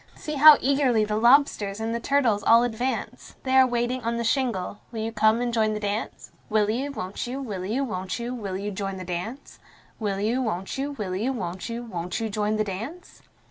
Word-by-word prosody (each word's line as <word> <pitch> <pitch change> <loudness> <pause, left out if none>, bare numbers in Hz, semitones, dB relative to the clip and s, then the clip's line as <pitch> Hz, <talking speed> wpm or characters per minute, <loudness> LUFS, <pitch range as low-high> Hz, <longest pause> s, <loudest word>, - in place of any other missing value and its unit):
See 305 - -6
how 300 +1 +9
eagerly 260 -5 +2
the 210 0 -2
lobsters 225 -4 +3
and 225 +1 -2
the 235 - -1
turtles 240 -5 +2
all 230 +1 +6
advance! 245 0 -3
They 260 0 0
are 260 -1 +7
waiting 240 +1 -1
on 230 0 -2
the 235 - -1
shingle 225 -6 -1
will 225 -2 -4
you 225 +1 -2
come 220 +1 +3
and 240 -1 -1
join 215 -2 +2
the - - -3
dance? 205 +1 -4 0.2
Will 215 -1 +2
you, 270 +5 -2
won't 195 -4 -5
you, 260 +3 -4
will 205 -9 -5
you, 235 +8 -1
won't 185 -7 -3
you, 240 +1 -4
will 200 -6 -4
you 205 +2 -4
join 195 -1 -4
the 185 - -7
dance? 185 +10 -6 0.4
Will 200 -3 -2
you, 230 +5 0
won't 195 -6 -3
you, 280 +2 -3
will 200 -8 -4
you, 225 +8 0
won't 185 -5 -5
you, 235 +1 -4
won't 180 -6 -4
you 225 -1 -3
join 210 +1 0
the 215 - +1
dance? 225 - -7
225 Hz, 220 wpm, -25 LUFS, 205-250 Hz, 0.4 s, how